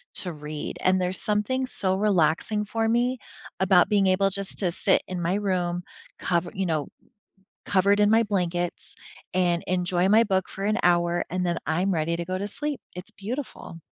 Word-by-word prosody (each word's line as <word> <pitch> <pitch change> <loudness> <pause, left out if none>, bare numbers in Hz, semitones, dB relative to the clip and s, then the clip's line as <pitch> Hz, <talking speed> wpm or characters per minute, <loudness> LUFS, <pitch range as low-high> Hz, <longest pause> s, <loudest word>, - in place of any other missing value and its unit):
to 180 -3 -5
read, 150 0 -6
and 185 0 +3
there's 180 +1 -1
something 220 +5 0
so 190 -6 -1
relaxing 200 +1 +1
for 225 +1 -1
me 245 +3 +1 0.4
about 190 -1 +4
being 200 -2 +3
able 190 +1 +3
just 195 0 -5
to 185 -4 +1
sit 190 +3 +2
in 180 -1 -4
my 170 +3 0
room 180 -4 -1 0.4
cover 170 -1 0
you 190 - -2
know, 155 -3 -1 0.8
covered 200 +1 +3
in 205 - +5
my 225 +1 +5
blankets 175 -4 -2 0.4
and 175 -2 +2
enjoy 180 0 +1
my 220 +3 +6
book 190 -3 0
for 195 - -6
an 215 +1 +1
hour, 175 0 +2
and 180 0 -2
then 170 -1 0
I'm 180 +5 +1
ready 165 0 0
to 170 - -4
go 185 +2 -3
to 200 - -3
sleep, 295 +7 -4
it's 180 +1 -8
beautiful. 215 - -7
185 Hz, 180 wpm, -25 LUFS, 175-205 Hz, 0.8 s, my